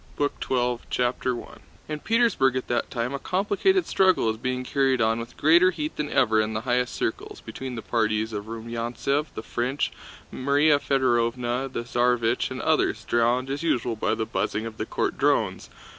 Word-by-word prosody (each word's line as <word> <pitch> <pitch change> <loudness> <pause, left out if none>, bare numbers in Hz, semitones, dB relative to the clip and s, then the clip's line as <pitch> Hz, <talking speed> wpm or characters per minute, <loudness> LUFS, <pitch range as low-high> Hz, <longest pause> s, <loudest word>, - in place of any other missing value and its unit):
BOOK 145 0 -1
TWELVE: 125 -2 0
1812 - - -27
CHAPTER 125 0 -1 0.4
I - - -4
In 150 - -3
Petersburg 225 - +2
at 130 - -3
that 120 - 0
time 120 +1 -2
a 140 - -3
complicated 205 - +1
struggle 190 -7 +3
was 110 0 0
being 125 +2 -2
carried 135 0 +1
on 110 0 +2
with 115 +1 -8
greater 170 +4 +5
heat 155 -4 -4
than 150 -1 -3
ever 110 -6 +3
in 110 +1 -2
the 110 - -2
highest 125 0 0
circles, - - -3
between 130 -2 -7
the 115 - -6
parties 110 -1 0
of 105 -1 -4
Rumyántsev, 115 +6 -2
the 110 - -5
French, 125 +5 -1 0.4
Márya 145 +2 +3
Fëdorovna, 125 -1 0
the 120 - -3
Tsarévich, 120 -2 +1
and - - -5
others, - - +1
drowned 120 +3 +1
as 140 - -3
usual 125 -8 0
by 110 - 0
the 110 0 -2
buzzing 110 0 -2
of 110 -1 -7
the - - -4
court - - -2
drones. - - +1
125 Hz, 185 wpm, -25 LUFS, 115-140 Hz, 0.4 s, greater